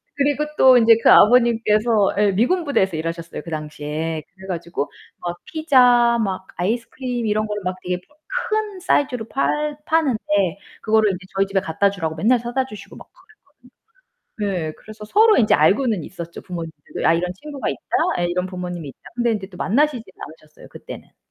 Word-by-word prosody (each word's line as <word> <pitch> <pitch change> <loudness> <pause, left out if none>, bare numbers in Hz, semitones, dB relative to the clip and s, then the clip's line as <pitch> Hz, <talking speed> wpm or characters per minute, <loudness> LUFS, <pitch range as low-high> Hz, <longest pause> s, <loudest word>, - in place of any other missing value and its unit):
그리고 285 +1 +1
또 260 -1 +7
인제 225 -1 +6
그 - - +7
아버님께서 225 -2 +4
에 205 -1 +3
미군 290 - +1
부대에서 190 - +1
일하셨어요 165 +1 -5
그 170 - -9
당시에. 155 +1 -4
그래 190 0 -12
가지고 170 -5 -4 0.3
막 175 0 -5
피자, 250 -8 +4
막 190 -1 -4
아이스크림 235 +5 -2
이런 215 +1 0
거를 210 -2 -4
막 185 0 -2
되게 180 0 -2
파 295 +12 -21 0.3
큰 430 -3 -2
사이즈로 250 - 0
팔 295 +2 -1
파는데 300 -8 +1 0.6
그거를 220 -2 +3
인제 185 0 -7
저희 195 0 +2
집에 195 0 +1
갖다 190 +2 +1
주라고 165 -5 -4
맨날 230 +9 +3
사다 245 +3 -2
주시고 210 -5 -11
막 - - -13 1.3
그랬거든요. 190 -6 -2
네 - - -4
그래서 215 0 -12
서로 435 - +5
인제 220 - +4
알고는 200 - +3
있었죠 170 -2 -8
부모님들도. 165 -5 -7
아 165 - +5
이런 180 +2 -1
친구가 285 +6 -6
있다. - - -5 0.4
아 - - -1
이런 180 +1 -1
부모님이 180 -4 -6
있다. - - -14
근데 240 -1 +1
이제 195 -3 -5
또 180 -3 -14
만나시진 270 +3 +1 0.4
않으셨어요 155 0 -18
그때는. - - -11
210 Hz, 390 characters per minute, -21 LUFS, 175-250 Hz, 1.3 s, 또